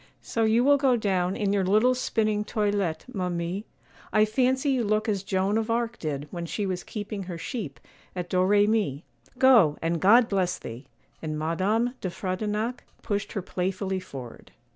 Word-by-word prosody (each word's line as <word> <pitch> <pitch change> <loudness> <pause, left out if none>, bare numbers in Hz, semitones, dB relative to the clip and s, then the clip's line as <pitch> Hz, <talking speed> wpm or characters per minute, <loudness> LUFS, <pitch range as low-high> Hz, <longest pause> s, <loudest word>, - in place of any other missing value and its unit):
'So 225 - -2
you 225 +2 +3
will 285 +2 +5
go 265 -3 +3
down 190 -4 0
in 200 -1 0
your 200 -1 +2
little 215 +7 +4
spinning 215 -4 0
toilette, 205 -6 -1
ma 185 -4 -1
mie; 175 +4 -3 0.5
I 215 0 +4
fancy 260 +5 +1
you 255 -3 +1
look 215 +1 0
as 200 -3 0
Joan 195 +2 0
of 225 0 -3
Arc 230 0 -1
did 145 -2 -3
when 170 -1 -5
she 205 +4 -2
was 185 -2 -3
keeping 205 -1 -5
her 175 -2 -6
sheep 165 - -5 0.4
at 180 -1 -3
Doremi. 200 -4 +2 0.3
Go, 235 - +6
and 165 0 -1
God 230 +5 +6
bless 185 -3 0
thee!' 120 +5 -9 0.3
and 155 -1 -3
Madame 195 +10 0
de 185 - -2
Frontignac 210 +6 -3 0.2
pushed 205 -2 -2
her 200 -5 -3
playfully 190 +1 -2
forward. 135 -9 -10
200 Hz, 170 wpm, -26 LUFS, 180-220 Hz, 0.5 s, Go